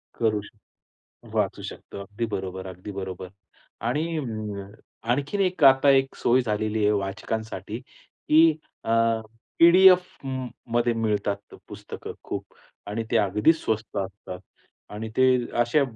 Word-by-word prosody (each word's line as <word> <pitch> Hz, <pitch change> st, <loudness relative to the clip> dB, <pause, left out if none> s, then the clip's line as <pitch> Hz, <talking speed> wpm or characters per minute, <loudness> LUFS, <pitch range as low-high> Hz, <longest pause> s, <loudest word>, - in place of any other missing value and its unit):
करू 110 Hz, -2 st, +1 dB
शकतो, 105 Hz, +1 st, -18 dB, 0.7 s
वाचू -, -, 0 dB
शकतो. -, -, -8 dB
अगदी 105 Hz, +4 st, -4 dB
बरोबर, 95 Hz, 0 st, -6 dB
अगदी 95 Hz, +2 st, -8 dB
बरोबर. 95 Hz, -1 st, -6 dB, 0.6 s
आणि 160 Hz, +6 st, -1 dB
अ, 105 Hz, -6 st, -5 dB, 0.4 s
आणखीन 145 Hz, +10 st, 0 dB
एक 185 Hz, -5 st, +2 dB
आता 135 Hz, +1 st, +7 dB
एक 135 Hz, 0 st, +1 dB
सोय 125 Hz, +2 st, +3 dB
झालेली 110 Hz, -1 st, -1 dB
आहे 105 Hz, -, +4 dB
वाचकांसाठी, 105 Hz, +1 st, -4 dB
की 155 Hz, +5 st, +2 dB, 0.3 s
अ, -, -, -3 dB, 0.7 s
पी-डी-एफमध्ये 135 Hz, -10 st, +4 dB
मिळतात 105 Hz, -3 st, -2 dB
पुस्तकं -, -, -8 dB
खूप -, -, -6 dB, 0.3 s
आणि 110 Hz, +2 st, -3 dB
ते -, -, +3 dB
अगदी 105 Hz, -, +4 dB
स्वस्त 110 Hz, -11 st, -3 dB
असतात. 95 Hz, -2 st, -5 dB, 0.5 s
आणि 105 Hz, +2 st, -5 dB
ते 130 Hz, 0 st, +5 dB, 0.3 s
अशा 120 Hz, +5 st, +3 dB
110 Hz, 120 wpm, -25 LUFS, 100-135 Hz, 0.7 s, आता